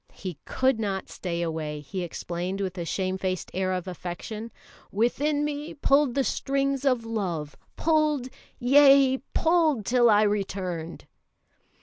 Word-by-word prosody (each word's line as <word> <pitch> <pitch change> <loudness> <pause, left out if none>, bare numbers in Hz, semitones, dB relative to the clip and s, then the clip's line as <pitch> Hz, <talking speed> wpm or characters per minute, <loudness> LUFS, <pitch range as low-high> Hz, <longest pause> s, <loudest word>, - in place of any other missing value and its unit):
He 180 -6 -7
could 260 -3 +1
not 195 -3 -3
stay 170 -2 -3
away, 155 -2 -3
he 150 +6 -5
explained, 175 +2 -4
with 190 -2 -3
a 170 - -3
shame 185 +2 -2
faced 185 -1 -3
air 185 0 0
of 185 0 -3
affection. 185 +6 -6 0.4
"Within 290 +7 +1
me 295 +1 -4
pulled 275 -2 +3
the 275 - +2
strings 275 +1 -1
of 250 -4 +2
love; 180 -10 -3 0.2
pulled, 305 -5 +1 0.3
yea, 270 0 +6 0.2
pulled 320 - +2
till 240 0 +4
I 210 0 +5
returned." 185 -5 -2
210 Hz, 135 wpm, -26 LUFS, 180-275 Hz, 0.4 s, yea